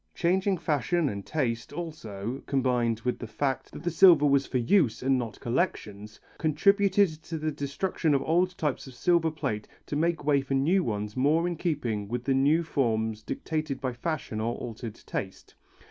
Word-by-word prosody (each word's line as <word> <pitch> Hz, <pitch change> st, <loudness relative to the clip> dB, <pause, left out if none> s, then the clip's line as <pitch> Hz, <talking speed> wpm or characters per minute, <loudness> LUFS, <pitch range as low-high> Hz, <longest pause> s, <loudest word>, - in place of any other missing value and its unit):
Changing 190 Hz, +2 st, +1 dB
fashion 160 Hz, +1 st, 0 dB
and 100 Hz, -3 st, -5 dB
taste 120 Hz, -7 st, -2 dB
also, 130 Hz, -, -5 dB
combined 125 Hz, -4 st, +1 dB
with 125 Hz, +1 st, -2 dB
the 115 Hz, -, -6 dB
fact 135 Hz, +3 st, -2 dB
that -, -, -9 dB
the 175 Hz, -, 0 dB
silver 165 Hz, -2 st, +7 dB
was 140 Hz, -1 st, +3 dB
for 130 Hz, -, -1 dB
use 125 Hz, -, +2 dB
and 135 Hz, 0 st, +3 dB
not 115 Hz, -3 st, -5 dB
collections, 105 Hz, -, -2 dB, 0.2 s
contributed 195 Hz, +1 st, +3 dB
to 165 Hz, 0 st, -5 dB
the 155 Hz, 0 st, -2 dB
destruction 145 Hz, +2 st, -1 dB
of 135 Hz, -, +1 dB
old 180 Hz, +3 st, +1 dB
types 150 Hz, -4 st, -2 dB
of 130 Hz, -, -11 dB
silver 170 Hz, +4 st, +2 dB
plate 110 Hz, -9 st, -3 dB, 0.2 s
to -, -, -4 dB
make 165 Hz, 0 st, 0 dB
way 145 Hz, -2 st, +3 dB
for 135 Hz, 0 st, -2 dB
new 170 Hz, +8 st, +3 dB
ones 105 Hz, -3 st, -3 dB
more 155 Hz, +6 st, +2 dB
in 175 Hz, -, -2 dB
keeping 125 Hz, -, -2 dB
with 120 Hz, +3 st, -3 dB
the 135 Hz, -, +1 dB
new 145 Hz, +5 st, +3 dB
forms 110 Hz, -8 st, 0 dB
dictated 155 Hz, -, -3 dB
by 130 Hz, -2 st, -2 dB
fashion 135 Hz, -6 st, -3 dB
or 115 Hz, +2 st, -1 dB
altered 115 Hz, -1 st, -7 dB
taste. 95 Hz, -4 st, -6 dB
140 Hz, 175 wpm, -28 LUFS, 120-165 Hz, 0.2 s, silver